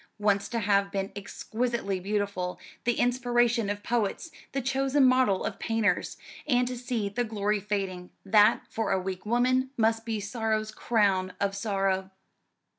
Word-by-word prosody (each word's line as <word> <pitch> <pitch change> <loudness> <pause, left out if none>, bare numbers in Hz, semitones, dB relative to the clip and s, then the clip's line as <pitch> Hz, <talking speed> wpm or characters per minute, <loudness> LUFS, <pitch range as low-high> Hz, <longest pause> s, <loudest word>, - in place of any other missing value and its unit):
Once 205 -1 +1
to 235 - -2
have 200 -2 +2
been 195 0 -2
exquisitely 220 0 -3
beautiful, 200 -2 -2 0.3
the 240 0 +1
inspiration 240 -2 +2
of 205 0 -3
poets, 235 - -1 0.2
the 275 - -1
chosen 270 +1 +2
model 255 -7 +3
of - - -4
painters, 220 -5 0 0.3
and 250 -3 +3
to 250 - -3
see 240 -4 -2
the 205 +5 -1
glory 210 -2 0
fading 195 -3 -3 0.2
that, 210 +1 +5
for 225 - -2
a 190 - +2
weak 185 +1 -5
woman, 255 +3 +2
must 225 0 +2
be 225 -2 -2
sorrow's 215 0 -1
crown 195 -5 +1
of 200 0 0
sorrow. 195 -2 0
215 Hz, 150 wpm, -28 LUFS, 200-240 Hz, 0.3 s, that